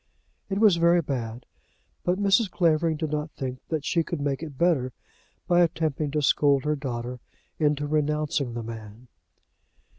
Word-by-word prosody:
It 195 - -1
was 205 -4 +5
very 170 0 +4
bad, 120 -4 -4 0.6
but 180 +1 +1
Mrs. 200 +1 +3
Clavering 165 -3 +2
did 155 -1 -3
not 150 +1 -2
think 130 -1 -5
that 155 -3 -2
she 165 - +2
could 165 0 -4
make 140 -1 -1
it 150 -5 -7
better 140 -7 +2 0.5
by 175 0 +4
attempting 155 -3 0
to 150 +1 -1
scold 140 -1 +3
her 150 0 +1
daughter 125 -3 -5 0.4
into 145 -1 +1
renouncing 150 -4 0
the 120 - -4
man. 110 +1 -9
150 Hz, 155 wpm, -26 LUFS, 130-165 Hz, 0.6 s, was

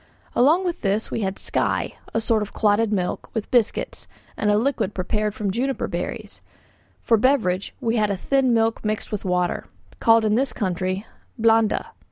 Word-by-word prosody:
Along 315 +10 +4
with 350 -2 -2
this, 205 +2 0
we - - -1
had 190 -1 -2
'skye,' - - 0 0.2
a - - 0
sort 220 -1 +1
of 210 - -4
clotted 215 +1 +2
milk, 185 -4 -2
with 220 - -3
biscuits, 240 -4 0 0.3
and 210 - 0
a 205 - +4
liquid 230 -4 0
prepared 210 +3 -1
from 205 -2 -1
juniper 260 +6 -1
berries; - - -5 0.6
for 230 - +4
beverage 215 -7 +1
we 230 0 0
had 210 -1 +2
a 200 - -1
thin 270 +5 +2
milk 225 -1 +1
mixed 215 +1 -2
with 210 -2 -4
water, 180 -1 0 0.3
called 225 -1 +5
in 210 - +2
this 260 +4 +1
country 185 -1 -2 0.3
'blanda.' 225 -1 +3
215 Hz, 175 wpm, -23 LUFS, 200-230 Hz, 0.6 s, called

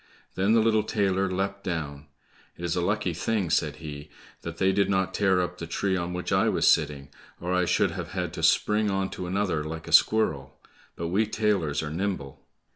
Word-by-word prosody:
Then 95 +4 +2
the 115 - +5
little 110 -1 +3
tailor 95 -3 0
leapt 100 +1 -2
down. 75 -4 -4 0.5
"It 85 - -5
is 85 0 -1
a 90 - 0
lucky 100 0 0
thing," 95 0 -1
said - - +1
he, 75 -1 -8 0.3
"that 85 0 -7
they 95 0 +3
did 100 0 +1
not 95 -1 +1
tear 95 -2 +2
up 90 0 -4
the 85 - -5
tree 95 +3 -1
on 85 -1 -2
which 90 0 -4
I - - +3
was - - +2
sitting, 75 -2 +2 0.3
or 90 +1 -2
I 90 0 +2
should - - +2
have - - -6
had - - -3
to - - -5
spring 105 0 +3
on 95 -1 -1
to 90 - -5
another 95 -4 0
like 80 +1 -6
a - - -6
squirrel; 70 -12 +3 0.4
but 85 0 -4
we 105 +5 +1
tailors 100 -10 0
are 75 - -4
nimble." 85 -5 -4
90 Hz, 205 wpm, -26 LUFS, 80-100 Hz, 0.5 s, the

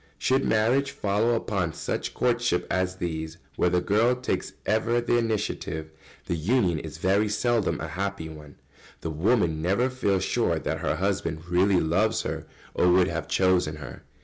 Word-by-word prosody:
] 75 - -34
Should 130 - +2
marriage 120 +6 +2
follow 105 +3 +1
upon 100 -7 -1
such - - -4
courtships 120 -6 +1
as 95 0 0
these, 80 -3 -4 0.2
where 90 - +2
the 90 0 +2
girl 110 +7 +3
takes 125 +1 -3
ever 115 +2 +2
the 120 0 +2
initiative, 100 -8 -2 0.3
the - - -2
union 90 0 +1
is - - -8
very 100 +3 +2
seldom 115 0 +1
a 80 - -4
happy 95 0 -3
one. 75 -2 -11 0.5
The 80 - -3
wife 90 +6 +2
never 90 +11 0
feels 100 -7 0
sure - - +1
that - - -3
her - - 0
husband 85 -3 -2
really 90 +2 +3
loves 105 +8 +1
her - - -4 0.3
or 90 - +3
would 90 0 +4
have - - -3
chosen 90 -4 +2
her. 70 -4 -9
95 Hz, 170 wpm, -26 LUFS, 85-115 Hz, 0.5 s, would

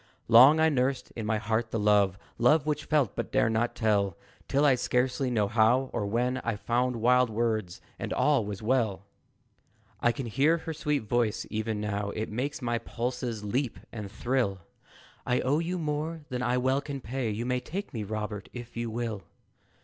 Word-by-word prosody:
Long 130 +7 +8
I 160 0 +5
nursed 135 -2 0
in 110 -2 -4
my 110 0 +1
heart 110 +2 -1
the 115 - -2
love, 105 -2 +3 0.2
Love 145 +5 +4
which 150 -1 -1
felt, 145 -8 +1
but - - -4
dared 110 - +3
not 115 +2 0
tell, 100 -5 +1 0.3
Till, 140 +2 +2
I 140 - +6
scarcely 125 +1 0
know 110 -4 +1
how 120 +5 +3
or 105 -4 -1
when 125 +4 0
It 115 -4 -2
found 125 +1 +1
wild 125 +2 +3
words, 110 -5 -1 0.2
and - - -4
all 145 -5 +3
was 100 0 -6
well! 110 -5 0 0.9
I 120 - +3
can 130 +2 -5
hear 140 +8 +2
her 160 0 -5
sweet 150 -3 -1
voice 115 0 0
even 110 0 -2
now 105 -1 -2
It 110 0 -3
makes 130 +4 -3
my 120 -1 0
pulses 120 -2 -4
leap 120 +4 -1
and 105 -4 -7
thrill 115 -4 -1 0.6
"I 125 - +1
owe 140 +4 +1
you 175 +2 -2
more 155 0 -3
than 125 -2 -3
I 125 0 +1
well 130 +2 +1
can 140 -1 -5
pay; 125 -1 -3
You 110 +3 -3
may 125 0 0
take 195 +10 -6
me, 110 -3 -3
Robert, 105 0 -5
if 120 -1 -9
you 115 0 -2
will!" 110 -3 -3
120 Hz, 190 wpm, -28 LUFS, 110-130 Hz, 0.9 s, Long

